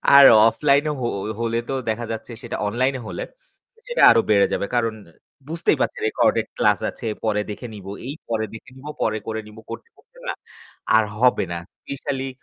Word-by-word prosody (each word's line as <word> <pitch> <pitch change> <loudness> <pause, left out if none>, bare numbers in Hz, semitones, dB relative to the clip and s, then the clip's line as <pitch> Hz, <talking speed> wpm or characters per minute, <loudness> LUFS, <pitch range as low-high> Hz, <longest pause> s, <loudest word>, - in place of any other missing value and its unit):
আর 140 - +11 0.3
অফলাইনে 140 +6 +2
হ - - -2 0.4
হলে 115 0 0
তো 135 - -1
দেখা 115 +2 -2
যাচ্ছে 115 +2 -6
সেটা 120 - -4
অনলাইনে 130 +4 0
হলে, - - -4 0.6
সেটা 485 0 0
আরও 115 0 +5
বেড়ে 100 -1 +5
যাবে। - - 0
কারণ 115 -2 +1 0.6
বুঝতেই 165 +1 +1
পারছেন - - -1
রেকর্ডেড - - +2
ক্লাস - - +3
আছে, - - -7 0.2
পরে 105 -1 +1
দেখে 120 +4 -7
নিব। 100 -2 -11 0.2
এই 140 - -4
পরে 110 -1 0
দেখে 115 - -11
নিব, 140 +3 -11 0.2
পরে 110 0 +1
করে 110 0 -2
নিব 105 +1 -14
করতে, 465 - -8
করতে - - -24
না, - - -1 0.6
আর 110 - +6 0.2
হবে 125 -5 +4
না, 85 - -3 0.2
স্পেশালি 135 -1 -4
115 Hz, 180 wpm, -22 LUFS, 110-135 Hz, 0.6 s, আর